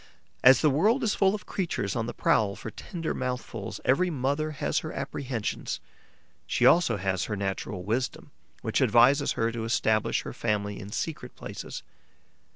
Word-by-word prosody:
As 130 0 +8
the 155 - +5
world 215 - +3
is 220 - +2
full 195 0 +3
of 210 - -8
creatures 175 - -2
on 115 -1 -1
the 120 - -4
prowl 100 -2 +2
for 110 - -7
tender 165 +6 -4
mouthfuls, 125 -5 -4
every 180 +8 +3
mother 145 +1 -1
has 150 - -1
her - - -6
apprehensions; 125 -6 -3 0.7
she - - +1
also 165 -11 +5
has 95 -1 -1
her 105 - -3
natural 95 -1 -3
wisdom, 115 +6 -2 0.3
which - - 0
advises 135 +4 +5
her 115 0 0
to 115 -1 -4
establish 110 -1 +1
her - - -6
family 105 -2 -1
in 100 0 -8
secret 160 +8 -4
places. - - -7
125 Hz, 160 wpm, -28 LUFS, 105-155 Hz, 0.7 s, As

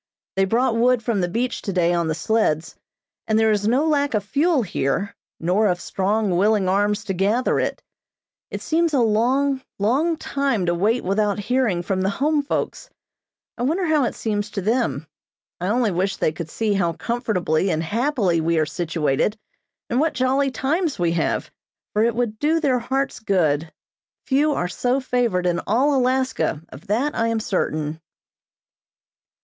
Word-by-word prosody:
They 195 0 +3
brought 230 +4 +1
wood 245 0 +3
from 220 -4 0
the 175 - +1
beach 240 +7 -2
today 180 -3 +1
on 170 -1 0
the 160 - -1
sleds, 170 -7 0 0.5
and 220 - +2
there 220 0 +4
is 205 0 0
no 260 +7 +2
lack 285 -4 +1
of 210 - 0
fuel 285 - +1
here, 185 +1 -2 0.2
nor 185 +6 +2
of 180 -2 0
strong, 200 +1 0
willing 205 +1 +2
arms 205 +2 +1
to 195 - -3
gather 205 +7 +1
it. - - -2 0.7
It - - -6
seems 325 -1 +1
a - - +3
long, 255 +5 +2 0.2
long 280 +11 +1
time 275 - -1
to 175 - +1
wait 215 +8 +1
without 200 +1 +1
hearing 210 -4 0
from 185 +1 -1
the 190 - +1
home 290 +8 +1
folks. 285 - -3 0.7
I - - -3
wonder 325 +9 +1
how 310 -3 +2
it - - -3
seems 210 -2 -2
to 200 - -4
them. 230 -5 0 0.5
I 180 - -2
only 230 +1 +1
wish 185 +3 -1
they - - +1
could 160 0 -7
see 215 +4 -1
how 175 -4 +1
comfortably 195 -7 -1
and 160 -2 0
happily 205 - 0
we 165 +1 +1
are 155 - +3
situated, 160 +3 -1 0.5
and 240 - 0
what 315 -1 +1
jolly 265 +2 +2
times 305 +5 -1
we 175 -1 +1
have, 165 -1 -1 0.4
for 210 - +2
it 230 -1 +1
would 230 -3 -2
do 315 +2 +2
their 270 -6 +2
hearts 270 +3 -2
good. 165 -7 +1 0.5
Few 290 +3 +2
are 175 - -1
so 250 +8 0
favored 240 -8 0
in 175 -1 +1
all 270 +7 +3
Alaska, 255 - 0
of 135 - -13
that 245 +9 0
I 230 - 0
am 230 -1 0
certain. 155 -6 -2
220 Hz, 175 wpm, -22 LUFS, 180-260 Hz, 0.7 s, there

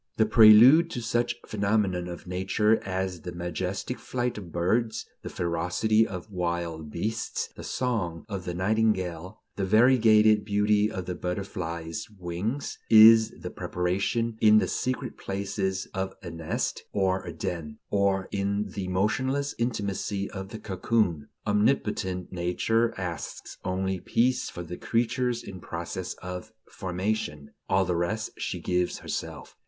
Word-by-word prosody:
The 110 - +4
prelude 115 +9 +8
to 125 - -4
such 120 +1 0
phenomena 100 -4 0
of 85 - -9
Nature 95 +4 +1
as 95 -2 -3
the 90 +2 -6
majestic 90 +6 -3
flight 125 -1 -2
of 90 -4 -10
birds, 110 +7 0 0.2
the - - -6
ferocity 90 +6 +1
of 95 +2 -7
wild 85 -3 -3
beasts, 110 +9 -3
the - - -9
song 105 -10 -2
of 100 -5 -5
the 90 - -3
nightingale, 95 -2 0 0.2
the 100 - -1
variegated 110 0 +5
beauty 105 0 +2
of 95 -1 -4
the 90 - -3
butterfly's 90 0 -4
wings, 95 +10 -3
is 110 0 +9
the - - -5
preparation 100 +6 -1
in 110 -1 +7
the - - +3
secret 130 0 -3
places 95 -1 -2
of 95 0 -3
a 85 - -6
nest 80 -1 -3
or 95 -1 +1
a 85 - -6
den, 80 -2 -5
or 100 -1 +2
in 100 0 -1
the 95 -2 -4
motionless 130 +10 0
intimacy 100 -4 -2
of 95 -1 -6
the 110 - -7
cocoon. 95 -5 0 0.2
Omnipotent 105 -4 0
Nature 105 +6 +1
asks 90 -3 -6
only 95 0 -1
peace 125 +7 +1
for 90 - -7
the 90 +1 -7
creature 120 +2 0
in 95 - -8
process 85 +2 -5
of 90 +4 -6 0.2
formation. 95 -5 -3 0.2
All 95 0 +3
the 90 -1 0
rest 110 +6 -1
she - - -3
gives 90 -1 0
herself. - - -6
95 Hz, 140 wpm, -27 LUFS, 90-110 Hz, 0.2 s, is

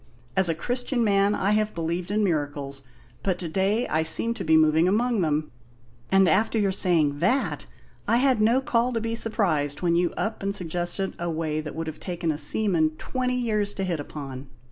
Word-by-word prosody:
As 190 -2 +4
a 165 - +1
Christian 245 - -1
man, 200 -1 +2
I 200 - 0
have 215 0 0
believed 170 +2 -3
in 210 +1 +1
miracles, 145 -5 -2 0.4
but 190 -3 -1
to 175 - -5
day 195 +7 0
I 155 - +1
seem 160 +9 +4
to - - -6
be 160 0 +4
moving 160 +2 +4
among 225 +2 +1
them. 155 -2 -1 0.6
And 195 -1 +5
after 215 +7 +2
your 200 -3 +2
saying 165 -7 +2
that, 260 - 0 0.4
I 230 - +3
had 255 -3 +2
no 235 +5 +3
call 245 -1 0
to 230 - 0
be 225 0 -3
surprised 180 -11 0
when 170 -1 +2
you 175 0 +2
up 220 +1 -3
and 200 0 -1
suggested 175 +2 -1
a 175 0 -2
way 155 -1 -2
that 155 -1 -8
would 165 0 -3
have 155 -1 -7
taken 175 -3 -3
a 150 - -4
seaman 160 -1 +1
twenty 250 +4 -2
years 215 -4 -1
to 195 - -3
hit 175 -4 -2
upon! 140 -2 -7
185 Hz, 200 wpm, -25 LUFS, 160-215 Hz, 0.6 s, And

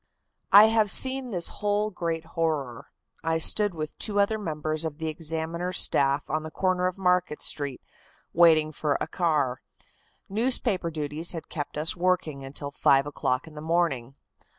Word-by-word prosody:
"I 205 +1 +10
have 220 -2 +2
seen 260 +4 +4
this 180 -6 +2
whole, 210 +1 -1
great 165 -3 -3
horror. 150 -8 -2 0.4
I 160 0 0
stood 205 +4 +3
with 155 -1 -5
two 205 -2 -1
other 215 +2 +1
members 155 -4 -3
of 155 -2 -4
the 160 0 -3
Examiner 165 +2 -3
staff 140 -5 +1
on 155 - -2
the 155 - -7
corner 185 +2 0
of 185 - -4
Market 180 -4 +1
Street, 140 -3 -3 0.5
waiting 160 -2 +5
for 150 -1 -1
a - - -2
car. 150 -8 -1 0.7
Newspaper 220 -4 0
duties 155 +2 -2
had 165 - -8
kept 145 -1 -5
us 155 +2 -1
working 175 -6 -1
until 140 +1 -7
five 140 -1 +3
o'clock 130 -3 -2
in 160 - -13
the 150 - -9
morning. 155 -6 -1
165 Hz, 160 wpm, -26 LUFS, 150-185 Hz, 0.7 s, I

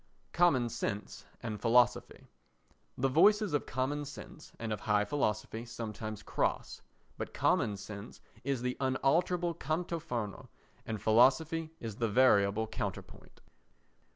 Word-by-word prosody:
Common 165 -9 +4
Sense 105 -2 -4 0.2
and 110 -3 -4
Philosophy 120 +1 +2 0.7
The 135 - +2
voices 205 +7 +4
of 145 - 0
common 135 +4 -1
sense 145 +1 -10
and 115 -1 -3
of 105 - -4
high 105 -1 +2
philosophy 110 -4 -1
sometimes 110 -2 -6
cross; - - -2 0.4
but - - -5
common 105 -1 +2
sense 100 +1 -9 0.2
is 135 -3 -1
the 125 0 -2
unalterable 165 +6 +1
canto 165 +2 -2
fermo 120 -10 -5 0.4
and 110 -2 -3
philosophy 135 +9 +3
is 110 -3 -6
the 115 -2 0
variable 105 -2 +4
counterpoint. 105 -4 -7
125 Hz, 125 wpm, -32 LUFS, 110-145 Hz, 0.7 s, Common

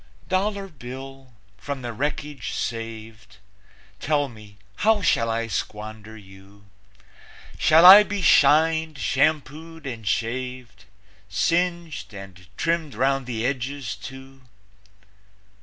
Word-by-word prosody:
Dollar 195 +1 -1
Bill, 135 -3 -10 0.3
from 140 -3 -6
the 120 -1 -5
wreckage 145 +3 -4
saved, 110 -2 -6 0.6
Tell 145 -1 0
me, 105 -3 -15 0.2
how 215 -2 +2
shall 115 -7 +2
I 115 +1 -1
squander 110 0 -6
you? 95 0 -17 0.9
Shall 160 +2 +6
I 195 +3 +12
be 205 -2 -3
shined, 160 +1 +4
shampooed 155 +4 -1
and 115 -5 -7
shaved, 115 -1 -3 0.4
Singed 170 - -1
and 95 -2 -11
trimmed 165 -6 -1
'round 135 +2 0
the 115 -2 -3
edges, 130 -4 -3
too? 135 +4 -11
130 Hz, 105 wpm, -24 LUFS, 110-155 Hz, 0.9 s, I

